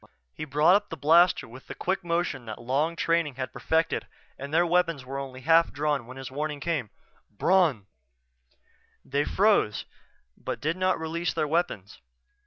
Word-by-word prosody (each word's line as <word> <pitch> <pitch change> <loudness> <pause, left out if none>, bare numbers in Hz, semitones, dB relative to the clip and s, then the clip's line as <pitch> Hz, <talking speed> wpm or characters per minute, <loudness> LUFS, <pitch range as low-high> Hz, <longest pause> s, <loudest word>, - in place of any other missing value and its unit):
He 155 - -6
brought 150 +4 +4
up 205 0 0
the 165 - -6
blaster 170 +5 +4
with 125 +3 -13
the - - -7
quick 190 +1 -2
motion 170 -7 -2
that 110 - -7
long 140 +8 0
training 165 -4 0
had 130 -1 -5
perfected 160 0 0 0.3
and 140 +1 -8
their 170 +3 +3
weapons 165 -5 +1
were 135 +2 -5
only 130 -1 -7
half 165 +4 +4
drawn 145 -4 -1
when 130 +1 -10
his 135 -1 -7
warning 150 +1 -3
came: 145 -7 -2 0.4
"Bron!" 155 - +2 1.2
They 140 +2 0
froze, 200 - +2 0.5
but - - -5
did 155 +3 -1
not 185 -1 +1
release 165 +2 -2
their 150 - 0
weapons. 145 - -2
155 Hz, 165 wpm, -27 LUFS, 135-170 Hz, 1.2 s, brought